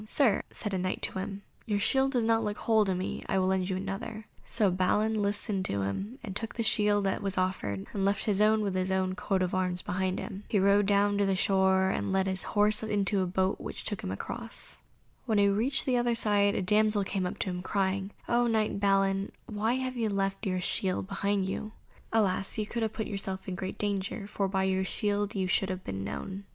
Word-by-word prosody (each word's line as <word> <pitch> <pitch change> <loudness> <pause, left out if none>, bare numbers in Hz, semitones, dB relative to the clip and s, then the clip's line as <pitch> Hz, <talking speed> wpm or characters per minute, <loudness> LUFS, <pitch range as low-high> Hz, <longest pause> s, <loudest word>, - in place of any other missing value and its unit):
"Sir," 230 -4 +3
said 210 -3 -4
a 190 - 0
Knight 185 0 -2
to - - 0
him, 200 +1 -5 0.2
"your 205 -2 +1
shield 270 +5 +2
does 240 -3 +2
not 225 0 +3
look 210 -1 -2
whole 220 -2 +3
to 190 -1 0
me; 185 +1 -3
I - - +2
will 185 - +2
lend 190 0 +1
you 185 - -1
another;" 200 +3 -5 0.2
so 215 -5 +1
Balin 210 +4 +1
listened 205 -1 0
to 100 0 -1
him 195 - -3
and 195 -4 -6
took 225 +2 -4
the 230 - -1
shield 210 -2 +3
that 195 - 0
was 195 -1 -2
offered, 145 - -1
and 200 - -1
left 200 0 +1
his 205 -2 +2
own 215 +1 +4
with 200 -2 -1
his 185 0 0
own 190 0 +1
coat 190 -1 0
of 180 - -2
arms 180 -1 -1
behind 185 0 -1
him. 200 -2 -6
He 210 - +1
rode 200 +1 +4
down 205 0 +3
to 200 - +3
the 195 - +2
shore, 190 0 +3
and - - -2
led 190 0 +2
his 190 0 -1
horse 210 0 +3
into 205 -2 +1
a 185 - 0
boat 190 +1 0
which - - -6
took 205 - -3
them - - -4
across. 230 - -5 0.5
When 220 -3 +2
he 200 0 +5
reached 230 +8 +1
the 255 -2 +2
other 240 -1 +2
side, 205 -2 +3
a - - 0
damsel 210 +2 +3
came 190 -2 -2
to - - -3
him 180 0 -4
crying, 195 0 -1 0.2
"O 240 0 +3
knight 220 -3 +1
Balin, 195 -1 +2
why 220 +2 0
have 255 0 -2
you 225 -2 +1
left 195 +1 -1
your 185 - 0
own 180 - -1
shield 185 0 -1
behind 200 -1 0
you? 215 +3 -4 0.4
Alas! 200 -3 +1
you 215 - 0
have 225 -2 -1
put 220 - -3
yourself 195 -2 -4
in 190 - -3
great 185 +1 -5
danger, 200 0 -2
for 200 -1 -1
by 190 0 0
your 190 0 +1
shield 205 +1 -1
you 190 -1 0
should 185 +1 +1
have 185 0 -4
been 95 0 -4
known. 190 - -5
200 Hz, 230 wpm, -29 LUFS, 190-215 Hz, 0.5 s, he